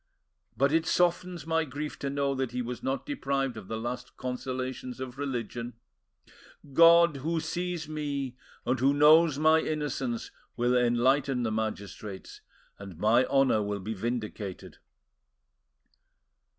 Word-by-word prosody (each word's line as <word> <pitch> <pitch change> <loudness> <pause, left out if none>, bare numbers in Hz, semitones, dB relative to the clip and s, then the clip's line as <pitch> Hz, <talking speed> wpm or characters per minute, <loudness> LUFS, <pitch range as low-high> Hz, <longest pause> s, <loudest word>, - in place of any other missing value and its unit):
But 140 +3 +3
it 165 +1 +2
softens 175 -1 +1
my 160 0 +1
grief 150 +1 -6
to 140 - -2
know 140 0 0
that 130 -2 -3
he 125 0 -1
was 120 -1 -5
not 135 +1 -2
deprived 135 - -1
of 110 -4 -9
the 110 - -3
last 125 +2 -5
consolations 130 0 -4
of 130 0 -7
religion! 120 -3 -4 1.0
God, 170 0 +7
who 160 +5 -1
sees 175 0 -3
me, 140 -4 -3 0.3
and 125 +1 0
who 135 +3 +3
knows 150 +1 +6
my 155 +1 +5
innocence, 145 -7 -3 0.3
will 120 +1 +2
enlighten 125 +2 +2
the 110 - -1
magistrates, 105 -2 -5 0.4
and 100 -4 -9
my 115 +7 +4
honour 135 -6 +3
will 105 0 -2
be 105 +4 -4
vindicated." 110 -3 -5
130 Hz, 135 wpm, -29 LUFS, 120-150 Hz, 1.0 s, God